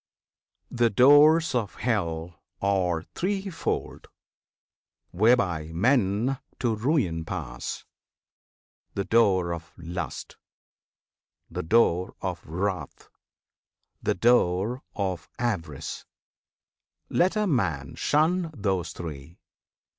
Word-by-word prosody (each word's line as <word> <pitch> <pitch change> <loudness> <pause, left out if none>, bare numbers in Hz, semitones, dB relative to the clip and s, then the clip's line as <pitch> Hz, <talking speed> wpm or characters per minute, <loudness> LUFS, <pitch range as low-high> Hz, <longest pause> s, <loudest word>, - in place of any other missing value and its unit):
The 120 -1 +3
Doors 145 +8 +6
of 115 -5 -1
Hell 85 -7 -2 0.2
Are 90 -4 +1
threefold, 195 -1 -3 1.0
whereby 95 -6 +2
men 115 +4 +2 0.2
to 120 -3 0
ruin 110 - 0
pass, 80 -9 -5 1.1
The 100 - 0
door 95 -7 +3
of 85 0 -8
Lust, 85 +2 -6 1.1
the - - -3
door 90 -1 +2
of - - -4
Wrath, 90 +4 -4 0.9
the - - 0
door 115 +2 +2
Of 95 -5 -3
Avarice. 90 - -3 1.0
Let 185 +4 +2
a 215 0 +1
man 90 - 0
shun 165 +4 +1
those 95 -5 -1
three! 80 -1 -8
100 Hz, 85 wpm, -26 LUFS, 85-125 Hz, 1.1 s, Doors